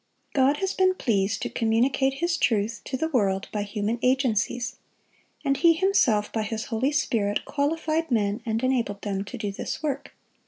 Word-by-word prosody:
God 275 +2 +3
has 385 +2 -1
been 370 0 +3
pleased 200 - 0
to - - -2
communicate 255 +4 +1
His 345 +4 0
truth 215 0 0
to 260 - -3
the 320 +5 -1
world 200 -8 +1
by 210 - -2
human 210 +2 -2
agencies, 250 -2 +1 0.7
and 275 0 +3
He 335 +4 +6
Himself, 320 - +2
by 220 - 0
His 220 +1 -3
Holy 255 +6 +1
Spirit, 220 -8 0
qualified 315 +2 -1
men 210 -4 +1
and 225 +1 -2
enabled 235 -6 0
them 195 -2 -2
to 245 +5 -8
do 210 -3 -3
this 195 - -5
work. 285 -3 -3
240 Hz, 170 wpm, -26 LUFS, 210-285 Hz, 0.7 s, He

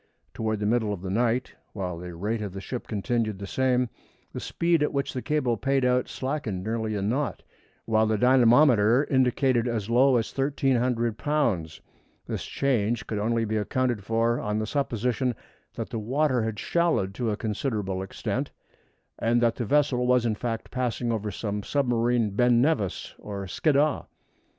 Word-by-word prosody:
Toward 110 -1 -2
the 105 - -2
middle 110 -1 +1
of 95 -2 -7
the 95 - -3
night, 120 +4 0 0.2
while 90 -4 -4
the 90 -1 -8
rate 105 +6 -2
of 100 -3 -5
the 95 - -5
ship 120 +5 -6
continued 110 0 -1
the 100 - -6
same, 125 +3 +1 0.5
the - - -4
speed 170 -2 +1
at 150 - +1
which 140 0 -2
the 130 - -3
cable 140 -6 0
paid 135 +5 +1
out 125 0 +2
slackened 130 -9 -3
nearly 110 0 -2
a 100 - -2
knot, 130 +8 -1 0.4
while 110 -1 +2
the 110 0 +1
dynamometer 125 0 +5
indicated 130 -2 +2
as 115 -2 -2
low 130 +2 +5
as 115 -2 -1
1,300 125 -4 +1
lbs. 115 - 0 0.4
This - - -4
change 120 -4 0
could 105 - -3
only 115 +2 +1
be 110 0 -1
accounted 120 0 -1
for 115 +2 +1
on 105 0 -2
the 110 - -1
supposition 125 -1 -1 0.4
that - - -4
the 115 - -2
water 130 +3 +1
had 110 -1 -2
shallowed 160 - +1
to 115 +3 -2
a 105 - -1
considerable 105 -4 -2
extent, 95 - -3 0.7
and 115 +1 +2
that 120 -1 +3
the 120 - -2
vessel 135 -1 +2
was 125 -1 +3
in 115 - +1
fact 115 +1 -4
passing 125 -1 -1
over 110 -2 -2
some 105 +1 -3
submarine 120 -3 +1
Ben 120 +3 +3
Nevis 125 - 0
or 100 -1 -6
Skiddaw. 145 - +1
115 Hz, 170 wpm, -26 LUFS, 105-130 Hz, 0.7 s, dynamometer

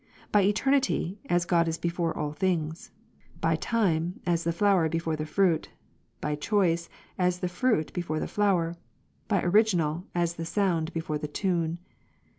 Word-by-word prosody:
By 210 - +5
eternity, 210 -2 +1
as 175 0 +2
God 170 -1 +2
is 165 0 -1
before 170 -1 -2
all 150 -1 -2
things; 160 -1 -1 0.5
by - - +2
time, 180 -6 0
as 170 -1 +1
the 170 - +2
flower 180 -2 +3
before 165 0 -1
the 155 0 -4
fruit; 175 -1 +2 0.5
by 150 - -2
choice, 170 +1 +1 0.3
as 180 -1 +2
the 180 - -2
fruit 180 -3 0
before 170 -3 -2
the - - -2
flower; 180 -5 +1 0.5
by 200 -4 +1
original, 175 -4 +2
as 170 -1 0
the 165 - -3
sound 175 -4 0
before 160 -2 -3
the 150 - -4
tune. 170 0 -1
175 Hz, 155 wpm, -28 LUFS, 165-195 Hz, 0.5 s, By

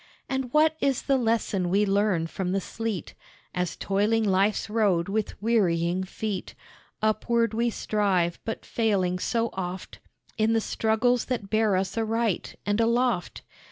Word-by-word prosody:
And 265 -2 -2
what 310 +2 +4
is 275 -2 +1
the 275 - +2
lesson 225 -7 0
we 200 +3 +3
learn 195 -4 +1
from 180 +2 -3
the 195 - +2
sleet, 225 0 -4 0.4
As 180 -2 -2
toiling 210 +3 +1
life's 200 +1 +2
road 205 -6 +1
with 215 +1 -2
wearying 180 -5 +2
feet, 195 0 -4 0.5
Upward 230 +1 +1
we 235 +2 +1
strive, 195 -6 0
but 225 - -5
failing 190 -6 0
so 230 +3 0
oft 185 0 -5 0.4
In 220 +1 +3
the 225 - +3
struggles 225 +2 +1
that 225 -6 -4
bear 215 -2 +3
us 190 +4 -1
aright 225 -2 -1
and 205 +2 +1
aloft? 235 -5 0
215 Hz, 145 wpm, -26 LUFS, 190-230 Hz, 0.5 s, what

